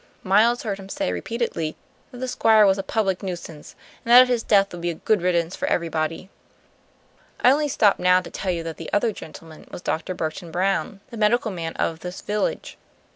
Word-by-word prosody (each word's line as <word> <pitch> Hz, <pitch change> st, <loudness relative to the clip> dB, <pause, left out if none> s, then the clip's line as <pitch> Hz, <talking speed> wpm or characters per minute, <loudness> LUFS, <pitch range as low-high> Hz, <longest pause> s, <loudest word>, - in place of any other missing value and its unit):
Miles 220 Hz, +6 st, +3 dB
heard 200 Hz, -4 st, -3 dB
him 195 Hz, 0 st, -11 dB
say 90 Hz, -, -2 dB
repeatedly 165 Hz, -, -3 dB, 0.3 s
that 250 Hz, -, -12 dB
the 255 Hz, +1 st, -4 dB
Squire 220 Hz, -3 st, +4 dB
was 195 Hz, 0 st, +3 dB
a -, -, +1 dB
public 195 Hz, -2 st, -1 dB
nuisance, 175 Hz, -5 st, -7 dB, 0.3 s
and 235 Hz, -, -2 dB
that 250 Hz, +1 st, +9 dB
his 245 Hz, -2 st, 0 dB
death 200 Hz, -2 st, +3 dB
would 175 Hz, -, -7 dB
be 175 Hz, -, -1 dB
a 170 Hz, -, -3 dB
good 210 Hz, +3 st, 0 dB
riddance 170 Hz, -1 st, 0 dB
for -, -, -3 dB
everybody. 165 Hz, +1 st, -2 dB, 1.1 s
I 250 Hz, -, +6 dB
only 295 Hz, +2 st, +2 dB
stop 215 Hz, -7 st, +3 dB
now 180 Hz, 0 st, +4 dB
to 180 Hz, -, -10 dB
tell 195 Hz, -, -4 dB
you 170 Hz, -2 st, -3 dB
that 165 Hz, -1 st, -6 dB
the -, -, -8 dB
other 220 Hz, +2 st, +2 dB
gentleman 160 Hz, -4 st, -12 dB
was 175 Hz, -, -9 dB
Dr. 180 Hz, +3 st, -2 dB
Burton 165 Hz, +2 st, -4 dB
Brown, 195 Hz, +3 st, -1 dB
the 230 Hz, -, -8 dB
medical 220 Hz, +1 st, +2 dB
man 165 Hz, -3 st, -5 dB
of 165 Hz, -1 st, -2 dB
this 180 Hz, +2 st, -7 dB
village. 210 Hz, -1 st, -3 dB
190 Hz, 200 wpm, -23 LUFS, 170-220 Hz, 1.1 s, that